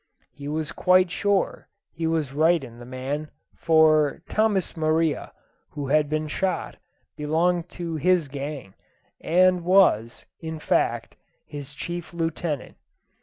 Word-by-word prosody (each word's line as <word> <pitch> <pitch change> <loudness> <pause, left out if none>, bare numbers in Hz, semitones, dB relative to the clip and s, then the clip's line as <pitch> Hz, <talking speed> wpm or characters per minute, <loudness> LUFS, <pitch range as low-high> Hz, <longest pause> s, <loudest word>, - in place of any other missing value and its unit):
He 145 -1 -9
was 155 0 -2
quite 185 -1 +3
sure 200 -1 0 0.2
he 165 0 -3
was 160 -4 -1
right 160 +1 +3
in 120 -2 -11
the 120 - -10
man; 135 +4 -4 0.2
for 155 -3 +3
Tomas 215 -4 +1
Maria, 160 -1 0 0.4
who 140 -2 -4
had 150 0 +3
been 155 0 -1
shot, 185 +5 -2 0.4
belonged 170 +3 0
to 170 -2 -3
his 180 -1 +2
gang, 140 -6 -6 0.5
and 180 +1 +3
was, 170 - +3
in 160 -1 -5
fact, 155 - 0 0.3
his 145 -1 -8
chief 175 +2 -6
lieutenant. 165 -3 -3
160 Hz, 125 wpm, -25 LUFS, 145-175 Hz, 0.5 s, quite